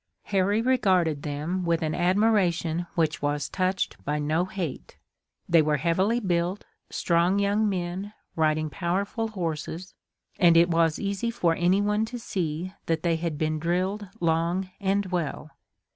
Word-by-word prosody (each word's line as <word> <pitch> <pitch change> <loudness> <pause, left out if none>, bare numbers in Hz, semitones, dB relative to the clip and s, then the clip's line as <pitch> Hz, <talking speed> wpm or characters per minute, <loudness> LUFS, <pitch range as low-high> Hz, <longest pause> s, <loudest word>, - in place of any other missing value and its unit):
Harry 200 +2 +1
regarded 185 - +2
them 150 +6 -3
with 170 -1 +1
an 155 -1 -1
admiration 175 -3 +2
which 160 -2 0
was 145 0 -1
touched 185 0 -1
by 150 +1 -1
no 155 +4 0
hate. 185 -7 -6 0.5
They 170 -1 +5
were 150 -1 +1
heavily 185 - +1
built, 180 -2 -1 0.2
strong 170 +3 +2
young 205 +2 +2
men, 185 +2 -3 0.2
riding 155 -1 +1
powerful 200 +7 -1
horses, 175 -2 -4 0.5
and 170 -2 +6
it 170 +1 +5
was 165 -1 +2
easy 200 +3 -2
for 180 -8 +1
anyone 205 +5 +2
to 245 +2 -6
see 180 -4 -3
that 165 -1 0
they 170 -2 +2
had 165 -2 -3
been 155 0 -1
drilled 185 +5 -1
long 170 +3 0
and 200 0 +1
well. 170 -4 -3
175 Hz, 145 wpm, -26 LUFS, 160-195 Hz, 0.5 s, and